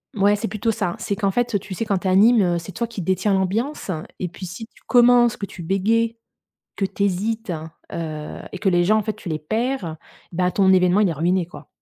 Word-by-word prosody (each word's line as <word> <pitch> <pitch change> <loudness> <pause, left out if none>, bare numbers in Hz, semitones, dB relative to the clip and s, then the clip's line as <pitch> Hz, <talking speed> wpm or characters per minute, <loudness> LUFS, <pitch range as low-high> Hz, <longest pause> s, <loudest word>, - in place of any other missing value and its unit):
mouais, 205 0 +4
c'est 225 +2 -3
plutôt 215 +3 -1
ça. 190 -6 -2
C'est 200 - -2
qu'en 200 -1 0
fait, 240 -1 0
tu 195 0 -8
sais, 225 - -3
quand 200 -3 0
tu 190 - -3
animes, 195 -2 +5
c'est 170 +3 -9
toi 235 +6 -3
qui 225 -4 -6
détient 190 +3 +1
l'ambiance. 200 +6 -1 0.3
Et 180 - -1
puis, 185 +2 -8
si 180 +6 -7
tu - - -25
commences, 240 -1 +5
que 200 - -4
tu 190 - -10
bégaies, 225 +6 +1 0.6
que 195 - 0
tu 200 - -3
hésites, 205 +2 -1 0.4
heu 155 -2 -5
et - - -5
que 195 - +2
les 175 -1 +3
gens, 215 +4 +4
en 215 - 0
fait, 215 - -2
tu 180 - -8
les 155 -1 -2
perds, 215 - -2 0.3
bah, 180 +1 +1
ton 190 -1 +4
événement, 180 +2 +4
il 200 - +3
est - - -1
ruiné, 175 +4 +1
quoi. 150 -4 -13
195 Hz, 230 wpm, -22 LUFS, 180-225 Hz, 0.6 s, animes